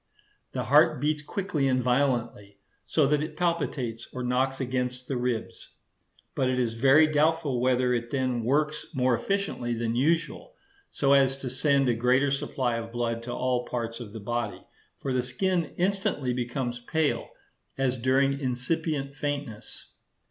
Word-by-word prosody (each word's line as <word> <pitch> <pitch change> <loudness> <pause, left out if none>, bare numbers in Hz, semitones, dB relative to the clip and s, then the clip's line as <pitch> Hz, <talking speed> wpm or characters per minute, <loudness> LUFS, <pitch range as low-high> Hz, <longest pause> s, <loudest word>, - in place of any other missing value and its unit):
The - - -2
heart - - +5
beats 150 0 0
quickly 155 -3 -1
and 130 -1 +2
violently, 120 -6 0 0.3
so 155 - +3
that 150 +1 +2
it 155 - -5
palpitates 140 -9 -2
or 125 - -5
knocks 130 +2 0
against 125 -1 -2
the 135 - -2
ribs; 120 -2 -3 0.6
but 130 - +1
it 130 - 0
is 120 -3 0
very 135 +6 +6
doubtful 155 -3 +1
whether 125 0 +2
it 120 -1 -2
then 130 -3 -1
works 150 +5 0
more 130 -1 +2
efficiently 120 - -1
than 115 0 -1
usual, 165 - 0 0.3
so 140 -1 +2
as 135 -1 +4
to 130 -2 -5
send 140 0 +2
a 120 - +3
greater 125 +4 +2
supply 130 -3 -1
of 115 0 -6
blood 115 -1 -2
to 120 +1 -6
all 125 0 0
parts 115 -1 -3
of 115 -4 -8
the 110 - -7
body; 120 +3 -3 0.3
for 135 - -3
the 130 - +2
skin 170 +6 -1
instantly 190 - 0
becomes 120 0 -3
pale, 155 +5 -1 0.5
as 135 -1 +1
during 135 +3 +2
incipient 140 +2 -2
faintness. 145 -6 -5
130 Hz, 155 wpm, -27 LUFS, 120-145 Hz, 0.6 s, very